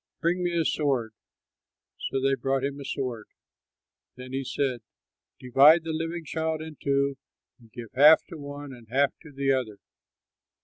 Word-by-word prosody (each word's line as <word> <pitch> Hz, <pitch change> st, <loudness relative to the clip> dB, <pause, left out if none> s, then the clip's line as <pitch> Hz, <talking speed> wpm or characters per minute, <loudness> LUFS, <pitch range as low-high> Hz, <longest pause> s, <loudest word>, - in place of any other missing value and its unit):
Bring 175 Hz, +1 st, 0 dB
me 175 Hz, -1 st, 0 dB
a 165 Hz, -, +1 dB
sword." 130 Hz, -7 st, 0 dB, 1.0 s
So 135 Hz, -, -1 dB
they 135 Hz, +1 st, +2 dB
brought 135 Hz, +1 st, -1 dB
him 140 Hz, +1 st, -3 dB
a -, -, -7 dB
sword. 125 Hz, -5 st, -4 dB, 0.9 s
Then 125 Hz, +1 st, -10 dB
he 135 Hz, 0 st, -2 dB
said, 130 Hz, -2 st, -2 dB, 0.6 s
"Divide 140 Hz, +6 st, +6 dB
the 160 Hz, -1 st, -3 dB
living 165 Hz, +1 st, -4 dB
child 160 Hz, +1 st, -2 dB
in 155 Hz, 0 st, -8 dB
two 140 Hz, -1 st, 0 dB, 0.4 s
and 115 Hz, -2 st, -20 dB
give 115 Hz, -3 st, -9 dB
half 150 Hz, +4 st, +7 dB
to 175 Hz, -, -8 dB
the -, -, -11 dB
one 145 Hz, -1 st, -8 dB
and 120 Hz, -3 st, -14 dB
half 135 Hz, +2 st, +2 dB
to 160 Hz, -, -13 dB
the 135 Hz, 0 st, 0 dB
other." 125 Hz, -6 st, -1 dB
140 Hz, 170 wpm, -27 LUFS, 130-155 Hz, 1.0 s, half